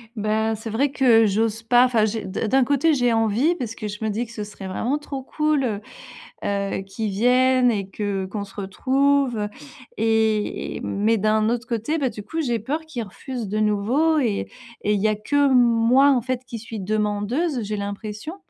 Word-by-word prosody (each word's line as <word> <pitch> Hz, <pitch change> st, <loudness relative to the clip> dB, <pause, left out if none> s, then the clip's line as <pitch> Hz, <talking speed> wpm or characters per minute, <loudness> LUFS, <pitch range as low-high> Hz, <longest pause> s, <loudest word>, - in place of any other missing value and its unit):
Bah, 220 Hz, +1 st, 0 dB
c'est 220 Hz, +1 st, -7 dB
vrai 255 Hz, +7 st, +1 dB
que 240 Hz, -5 st, +5 dB
j'ose 220 Hz, +2 st, 0 dB
pas. 245 Hz, +2 st, +5 dB
Enfin, 230 Hz, -4 st, +2 dB
j'ai 220 Hz, -1 st, -3 dB
d'un 190 Hz, +4 st, -3 dB
d'un 265 Hz, +4 st, +4 dB
côté, 285 Hz, +4 st, +2 dB
j'ai 245 Hz, -3 st, +2 dB
envie 225 Hz, +9 st, +2 dB
parce 230 Hz, -7 st, -5 dB
que, 215 Hz, -, -5 dB
je 210 Hz, +1 st, -6 dB
me 220 Hz, -, 0 dB
dis 220 Hz, +4 st, -2 dB
que 230 Hz, -, -14 dB
ce 215 Hz, -2 st, -5 dB
serait 205 Hz, -2 st, -9 dB
vraiment 240 Hz, +9 st, -1 dB
trop 285 Hz, -2 st, -6 dB
cool, 300 Hz, +1 st, 0 dB
heu 215 Hz, -4 st, -2 dB, 0.6 s
heu, 200 Hz, -1 st, -1 dB
qu'il 195 Hz, +3 st, -4 dB
vienne 250 Hz, +4 st, +3 dB
et 200 Hz, -4 st, -2 dB
que 195 Hz, -1 st, -3 dB
qu'on 200 Hz, +2 st, -5 dB
se 195 Hz, -, -15 dB
retrouve, 255 Hz, +2 st, +1 dB, 0.5 s
et 220 Hz, -1 st, 0 dB
mais 215 Hz, +3 st, +1 dB
d'un 215 Hz, +1 st, +2 dB
autre 240 Hz, +1 st, -1 dB
côté. 245 Hz, +7 st, -1 dB
Bah 270 Hz, -, +1 dB
du 210 Hz, -1 st, -8 dB
coup, 320 Hz, +11 st, -4 dB
j'ai 240 Hz, -6 st, 0 dB
peur 280 Hz, +9 st, -3 dB
qu'il 265 Hz, -7 st, -5 dB
refuse 230 Hz, +2 st, -6 dB
de 215 Hz, -, -2 dB
nouveau, 225 Hz, +10 st, +2 dB
et 225 Hz, -7 st, 0 dB, 0.3 s
et 210 Hz, -, +1 dB
il 205 Hz, -, 0 dB
y 215 Hz, -, +2 dB
a 215 Hz, -, +2 dB
que 285 Hz, +7 st, +2 dB
moi 245 Hz, +2 st, +5 dB
en 260 Hz, -3 st, +3 dB
fait, 255 Hz, +1 st, -3 dB
qui 240 Hz, -2 st, -7 dB
suis 225 Hz, -1 st, -7 dB
demandeuse, 215 Hz, -, -1 dB
j'ai 210 Hz, +1 st, -3 dB
l'impression, 210 Hz, -, -5 dB
heu, -, -, -15 dB
225 Hz, 200 wpm, -23 LUFS, 210-255 Hz, 0.6 s, que